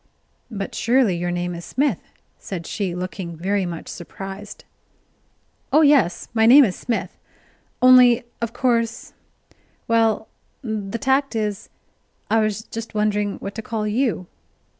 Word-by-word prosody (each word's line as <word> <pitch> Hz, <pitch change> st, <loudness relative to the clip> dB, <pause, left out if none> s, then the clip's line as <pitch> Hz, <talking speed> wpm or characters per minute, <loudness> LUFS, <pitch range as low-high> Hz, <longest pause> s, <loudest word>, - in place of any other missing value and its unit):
"But 200 Hz, -4 st, -5 dB
surely 235 Hz, -5 st, +2 dB
your 175 Hz, +1 st, -2 dB
name 175 Hz, 0 st, -2 dB
is 170 Hz, 0 st, -7 dB
Smith?" 265 Hz, -, 0 dB, 0.4 s
said 175 Hz, -4 st, -6 dB
she, 190 Hz, -3 st, -3 dB
looking 180 Hz, -1 st, -5 dB
very 190 Hz, +2 st, 0 dB
much 170 Hz, -2 st, -7 dB
surprised. 195 Hz, +3 st, -9 dB, 1.1 s
"Oh 305 Hz, -, +5 dB
yes, 275 Hz, -, +3 dB
my 225 Hz, -1 st, +4 dB
name 270 Hz, +3 st, +9 dB
is 190 Hz, -, -2 dB
Smith: 235 Hz, -, -4 dB, 0.6 s
only 250 Hz, -1 st, +7 dB, 0.2 s
of 230 Hz, -1 st, -2 dB
course 235 Hz, -2 st, -1 dB, 0.7 s
well, 225 Hz, -1 st, +2 dB, 0.4 s
the 215 Hz, -2 st, -3 dB
tact 270 Hz, 0 st, +1 dB
is, 210 Hz, -3 st, -3 dB, 0.6 s
I 225 Hz, -, +4 dB
was 215 Hz, 0 st, -1 dB
just 225 Hz, 0 st, -8 dB
wondering 210 Hz, -1 st, 0 dB
what 200 Hz, -, -5 dB
to 220 Hz, -, -5 dB
call 220 Hz, -2 st, -3 dB
you." 215 Hz, -3 st, 0 dB
215 Hz, 135 wpm, -22 LUFS, 195-235 Hz, 1.1 s, name